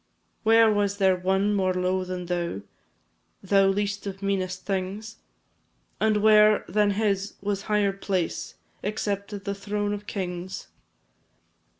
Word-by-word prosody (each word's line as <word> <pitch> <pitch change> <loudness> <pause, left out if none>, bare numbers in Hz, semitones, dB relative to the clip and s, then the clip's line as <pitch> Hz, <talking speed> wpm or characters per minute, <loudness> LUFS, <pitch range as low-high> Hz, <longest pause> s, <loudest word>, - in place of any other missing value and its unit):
Where 225 0 +5
was 205 -1 0
there 190 -2 +4
one 190 +3 +1
more 185 -2 +1
low 185 +1 0
than 180 -1 -5
thou 170 - -2 0.8
Thou 195 0 +4
least 205 +1 -1
of 195 0 -6
meanest 185 -2 -2
things? 200 +3 -3 0.8
And 215 -1 +2
where 215 -1 +6
than 210 0 +2
his 200 -2 0
was 200 0 -2
higher 205 -2 +2
place 190 -3 -3 0.3
Except 205 -1 -3
the 200 - -1
throne 205 +1 -2
of 205 0 -6
kings? 185 -1 -5
200 Hz, 125 wpm, -26 LUFS, 185-205 Hz, 0.8 s, where